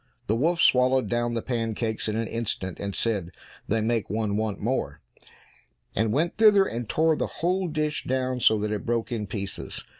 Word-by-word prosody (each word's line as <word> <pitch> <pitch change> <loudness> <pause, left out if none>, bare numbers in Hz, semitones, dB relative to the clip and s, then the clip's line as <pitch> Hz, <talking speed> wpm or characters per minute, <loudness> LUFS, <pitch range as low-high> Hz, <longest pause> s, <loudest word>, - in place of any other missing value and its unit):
The 110 - +1
wolf 165 +8 +1
swallowed 130 -2 +4
down 120 0 0
the 115 - -2
pancakes 115 -2 -2
in 110 - -1
an 115 0 -1
instant, 105 -5 -3
and 100 -1 -4
said, 100 -7 -1 0.4
"They 110 +1 +1
make 115 0 0
one 105 -1 -1
want 110 -1 -1
more," 100 - -2 1.0
and 110 +1 +1
went 160 +8 0
thither 210 -3 +6
and 115 - -4
tore 160 0 +3
the - - -1
whole 185 +2 -1
dish 155 -1 -2
down 130 -1 -1
so 110 -2 +5
that 105 0 -2
it 105 -1 -2
broke 120 0 -1
in 110 -3 -2
pieces. 100 0 -5
115 Hz, 185 wpm, -26 LUFS, 110-130 Hz, 1.0 s, thither